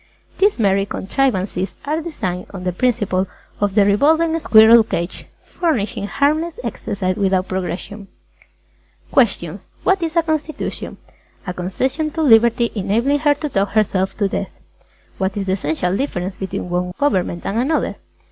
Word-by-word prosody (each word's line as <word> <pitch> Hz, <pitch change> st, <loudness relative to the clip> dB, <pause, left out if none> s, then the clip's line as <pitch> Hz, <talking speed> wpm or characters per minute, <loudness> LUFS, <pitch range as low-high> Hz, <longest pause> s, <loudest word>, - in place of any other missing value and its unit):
These 405 Hz, +1 st, +3 dB
merry 195 Hz, -3 st, +2 dB
contrivances 195 Hz, -4 st, -1 dB
are 305 Hz, +3 st, -1 dB
designed 185 Hz, -, -4 dB
on 185 Hz, -, -6 dB
the 180 Hz, -, 0 dB
principle 195 Hz, -3 st, 0 dB, 0.3 s
of 205 Hz, -1 st, 0 dB
the 205 Hz, -2 st, +5 dB
revolving 320 Hz, +10 st, +3 dB
squirrel 225 Hz, -3 st, +7 dB
cage, 175 Hz, -5 st, -4 dB, 0.2 s
furnishing 220 Hz, -, -2 dB
harmless 310 Hz, +7 st, 0 dB
exercise 190 Hz, -2 st, -3 dB
without 190 Hz, -2 st, +1 dB
progression. 190 Hz, +2 st, -5 dB, 1.0 s
QUESTIONS -, -, +1 dB
Q. -, -, -38 dB
What 380 Hz, -1 st, +2 dB
is 330 Hz, 0 st, -2 dB
a 335 Hz, -, +4 dB
Constitution? 310 Hz, -2 st, -3 dB, 0.5 s
A. 180 Hz, -, -3 dB
A -, -, -7 dB
concession 260 Hz, -, -2 dB
to 320 Hz, -, -1 dB
Liberty 235 Hz, -2 st, +4 dB
enabling 230 Hz, +8 st, +1 dB
her 290 Hz, -1 st, +3 dB
to 300 Hz, +1 st, -4 dB
talk 200 Hz, -7 st, 0 dB
herself 195 Hz, -3 st, +1 dB
to 205 Hz, -, +1 dB
death. -, -, -3 dB
_Q. -, -, -33 dB
What 190 Hz, +1 st, -1 dB
is 200 Hz, -, -2 dB
the 190 Hz, -, -1 dB
essential 180 Hz, 0 st, -1 dB
difference 190 Hz, -7 st, -2 dB
between 190 Hz, -1 st, -4 dB
one 180 Hz, 0 st, -1 dB
government 185 Hz, -10 st, 0 dB
and 210 Hz, +4 st, -1 dB
another? 290 Hz, +6 st, 0 dB
205 Hz, 155 wpm, -19 LUFS, 190-290 Hz, 1.0 s, squirrel